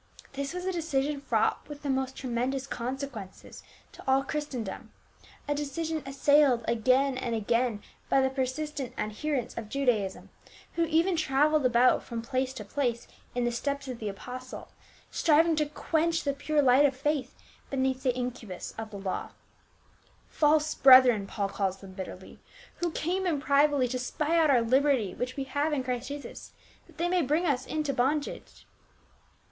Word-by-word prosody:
This 275 0 -3
was 360 +1 -5
a 375 - 0
decision 295 -4 -1
fraught 280 - 0
with 295 0 -9
the 285 - -3
most 265 0 -1
tremendous 255 +1 -2
consequences 250 -6 -6 0.3
to - - -13
all 265 +1 +4
Christendom, 270 -9 -5 0.6
a 290 - +1
decision 310 +2 -3
assailed 275 -3 +3
again 255 +3 +2
and 240 -3 -2
again 230 0 0 0.3
by 270 - +4
the 265 0 +2
persistent 270 +1 -3
adherents 245 +4 -2
of 220 -2 -6
Judaism, 225 -8 -1 0.4
who 335 - +1
even 330 +3 +2
traveled 300 -1 +3
about 245 +1 +4
from 230 -1 -6
place 255 +2 -1
to 210 - -7
place 240 0 -2 0.3
in 245 - 0
the 240 - +1
steps 280 +3 -3
of 250 -3 -5
the 215 - -3
apostle, 250 +6 -8 0.4
striving 325 +1 +4
to 300 -1 +1
quench 325 +2 0
the 280 - 0
pure 290 +1 +1
lirrht 270 +3 +6
of 265 -2 -5
faith 280 -2 -1 0.3
beneath 265 -1 0
the 255 -2 +1
incubus 245 -7 -5
of 220 -1 -5
the 205 - -8
law. 195 -1 -4 0.5
" - - -34
False 305 0 +4
brethren," 255 -6 +7
Paul 200 -1 -2
calls 195 -1 -1
them 195 -1 -12
bitterly,* 185 0 -9 0.2
" 485 - -22
who 345 - -1
came 365 +4 -1
in 315 -5 +1
privily 280 -1 +3
to 255 +1 -2
spy 300 +6 -1
out 315 -2 +4
our 255 -4 +5
liberty 260 -4 +2
which 250 +2 -4
we 275 - -1
have 290 +3 -1
in 280 -3 0
Christ 250 0 -3
Jesus, 285 0 -8 0.3
that - - -20
they 340 +1 0
may 360 0 +2
bring 305 +5 +1
us 260 -5 0
into 305 -3 -1
bondage." 280 +4 -2
270 Hz, 170 wpm, -28 LUFS, 245-295 Hz, 0.6 s, brethren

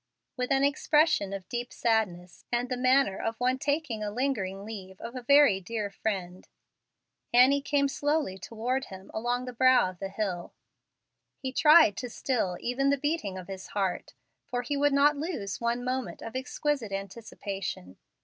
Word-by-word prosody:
With 250 +1 -2
an 270 0 +3
expression 285 -6 +3
of 195 -2 -6
deep 240 0 -4
sadness, 190 -7 -1
and 245 +1 0
the 255 - -1
manner 255 -4 +3
of 225 0 -3
one 255 +1 +1
taking 285 -6 -1
a 210 - -2
lingering 205 -5 -2
leave 190 -4 -8
of 235 - -7
a 255 - -4
very 280 -5 +5
dear 210 +1 -4
friend, 190 -3 -4 0.8
Annie 260 +4 +6
came 280 0 +1
slowly 290 -8 -1
toward 245 +6 -2
him 190 0 -11
along 245 +3 -1
the 250 - -6
brow 255 -5 +4
of 180 - -19
the 195 - -4
hill. 195 -4 -3 0.8
He 260 -1 -5
tried 305 - +7
to 250 - -4
still 220 -8 -1
even 275 +3 0
the 280 - +3
beating 290 - -2
of 185 - -8
his 190 -1 -7
heart, 190 -3 -2 0.3
for 245 0 -2
he 285 +4 -2
would 290 +1 +3
not 285 +1 +4
lose 280 - -4
one 235 +1 0
moment 255 +1 -3
of 225 - -7
exquisite 260 -2 -2
anticipation. 195 - -6
240 Hz, 170 wpm, -28 LUFS, 195-275 Hz, 0.8 s, tried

